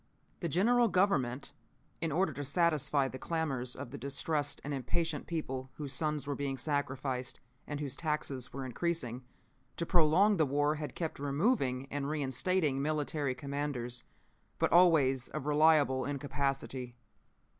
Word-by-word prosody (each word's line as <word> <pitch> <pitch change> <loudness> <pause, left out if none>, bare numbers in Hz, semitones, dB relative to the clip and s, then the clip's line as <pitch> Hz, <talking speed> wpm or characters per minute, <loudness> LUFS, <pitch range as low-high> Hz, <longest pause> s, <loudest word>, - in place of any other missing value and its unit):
"The 170 - -2
general 235 - +4
government, 150 - +1 0.5
in 165 -2 0
order 160 0 +1
to 145 +3 -5
satisfy 145 -2 +2
the 130 0 -7
clamors 135 -7 -1
of 120 - -7
the 140 - -7
distressed 145 +2 -1
and 145 - -3
impatient 155 +4 -2
people 135 -6 -3
whose 145 -3 -5
sons 150 +1 0
were 145 - -2
being 140 -1 -2
sacrificed, 135 -3 -2 0.3
and 145 -1 -4
whose 140 -3 -3
taxes 145 -5 -2
were 135 0 -5
increasing, 130 -3 -2 0.5
to 170 - -1
prolong 180 +5 +4
the 155 - +4
war 145 +2 +2
had 150 -1 -5
kept 165 -5 -3
removing 140 - +1
and 140 0 -2
reinstating 150 +1 +1
military 150 -2 -1
commanders, 140 -4 -3 0.5
but - - +1
always 150 -8 +5
of - - -5
reliable 150 -3 +4
incapacity. 135 -3 -2
145 Hz, 140 wpm, -32 LUFS, 135-160 Hz, 0.5 s, always